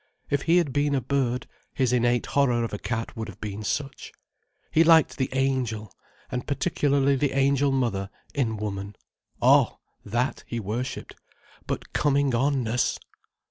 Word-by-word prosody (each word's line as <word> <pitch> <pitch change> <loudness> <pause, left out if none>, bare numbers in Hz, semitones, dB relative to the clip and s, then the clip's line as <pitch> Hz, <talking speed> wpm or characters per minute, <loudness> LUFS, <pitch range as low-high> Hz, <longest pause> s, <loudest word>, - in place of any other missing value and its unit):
If 140 - +2
he 170 +1 +3
had 160 -7 +1
been 145 0 +1
a - - +2
bird, 125 -1 -1 0.3
his 130 -2 +1
innate 120 -1 +2
horror 125 -4 +2
of 115 - -4
a 105 - -3
cat 115 -1 -3
would 110 -1 -4
have 105 - -11
been 105 0 -5
such. 135 +4 -3 0.6
He 160 - +5
liked 165 -1 +5
the 130 - 0
angel, 130 -6 -1 0.4
and 125 -1 -3
particularly 140 -1 +1
the 135 0 0
angel 140 +1 +3
mother 115 -8 0 0.2
in 115 -6 0
woman. 100 -1 -5 0.5
Oh!—that 120 +5 +1
he 120 - -3
worshipped. 115 +5 -4 0.5
But - - -4
coming 140 -2 +2
on 135 +2 +1
ness! 120 +2 0
130 Hz, 150 wpm, -26 LUFS, 115-140 Hz, 0.6 s, He